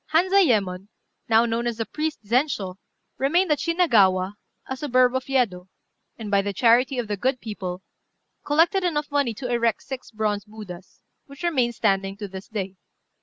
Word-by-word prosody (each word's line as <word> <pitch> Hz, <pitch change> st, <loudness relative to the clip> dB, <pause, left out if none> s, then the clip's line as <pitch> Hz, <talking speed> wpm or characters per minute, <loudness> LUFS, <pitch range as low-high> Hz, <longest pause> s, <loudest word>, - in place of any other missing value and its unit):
Hanzayémon, 245 Hz, -, +3 dB, 0.4 s
now 225 Hz, +1 st, +5 dB
known 235 Hz, +1 st, -1 dB
as 235 Hz, -2 st, -2 dB
the 225 Hz, -, -2 dB
priest 310 Hz, -2 st, -4 dB
Zenshô, 215 Hz, -6 st, 0 dB, 0.4 s
remained 335 Hz, +6 st, +2 dB
at 295 Hz, -, +2 dB
Shinagawa, 205 Hz, -, +3 dB, 0.3 s
a 265 Hz, -, -4 dB
suburb 255 Hz, -2 st, +2 dB
of 260 Hz, -, -1 dB
Yedo, 205 Hz, -9 st, 0 dB, 0.5 s
and, 215 Hz, -3 st, -6 dB
by 200 Hz, -1 st, +4 dB
the 200 Hz, 0 st, -3 dB
charity 245 Hz, +5 st, +3 dB
of 240 Hz, -3 st, -2 dB
good 255 Hz, 0 st, +1 dB
people, 190 Hz, -5 st, -6 dB, 0.6 s
collected 335 Hz, +6 st, +3 dB
enough 300 Hz, -4 st, -1 dB
money 280 Hz, -6 st, +1 dB
to 250 Hz, +3 st, -5 dB
erect 235 Hz, -2 st, 0 dB
six 265 Hz, -2 st, -7 dB
bronze 210 Hz, -2 st, -1 dB
Buddhas, 205 Hz, -4 st, -11 dB, 0.2 s
which 280 Hz, +3 st, -12 dB
remain 265 Hz, -9 st, +1 dB
standing 195 Hz, -3 st, 0 dB
to 205 Hz, -1 st, -5 dB
this 190 Hz, 0 st, -9 dB
day. 195 Hz, -3 st, -5 dB
235 Hz, 160 wpm, -24 LUFS, 200-280 Hz, 0.6 s, now